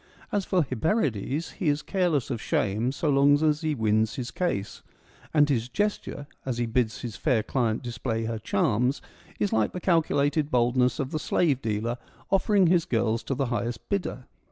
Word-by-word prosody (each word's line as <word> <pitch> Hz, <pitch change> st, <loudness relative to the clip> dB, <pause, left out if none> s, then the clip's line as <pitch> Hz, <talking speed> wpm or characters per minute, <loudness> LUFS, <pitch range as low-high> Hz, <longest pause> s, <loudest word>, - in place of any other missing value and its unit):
As 205 Hz, -2 st, 0 dB
for 180 Hz, -3 st, +2 dB
Hyperides, 140 Hz, -, -1 dB
he 180 Hz, -, -1 dB
is 145 Hz, +1 st, 0 dB
careless 175 Hz, -, 0 dB
of 115 Hz, -3 st, -3 dB
shame 110 Hz, +5 st, 0 dB
so 145 Hz, +3 st, -3 dB
long 140 Hz, +1 st, +5 dB
as 155 Hz, 0 st, +2 dB
he 155 Hz, -2 st, 0 dB
wins 110 Hz, -1 st, +1 dB
his 125 Hz, -2 st, -4 dB
case; 105 Hz, -, -2 dB, 0.5 s
and 150 Hz, -2 st, +4 dB
his 125 Hz, -4 st, 0 dB
gesture, 205 Hz, -2 st, -2 dB, 0.2 s
as 130 Hz, -3 st, -3 dB
he 120 Hz, -, 0 dB
bids 115 Hz, -1 st, 0 dB
his 120 Hz, -4 st, -5 dB
fair 125 Hz, -8 st, +1 dB
client 115 Hz, -2 st, -1 dB
display 115 Hz, -1 st, -3 dB
her 115 Hz, 0 st, -3 dB
charms, 115 Hz, +5 st, +1 dB, 0.4 s
is 205 Hz, -, 0 dB
like 110 Hz, -1 st, +1 dB
the 180 Hz, -, -4 dB
calculated 155 Hz, -4 st, +2 dB
boldness 125 Hz, -1 st, +2 dB
of 135 Hz, -1 st, -3 dB
the 155 Hz, -, -1 dB
slave 150 Hz, -3 st, +1 dB
dealer 115 Hz, +2 st, -2 dB, 0.3 s
offering 195 Hz, 0 st, +4 dB
his 170 Hz, -1 st, +3 dB
girls 115 Hz, 0 st, 0 dB
to 135 Hz, -, -1 dB
the 135 Hz, +1 st, 0 dB
highest 120 Hz, 0 st, -3 dB
bidder. 180 Hz, -10 st, -2 dB
130 Hz, 180 wpm, -26 LUFS, 115-155 Hz, 0.5 s, long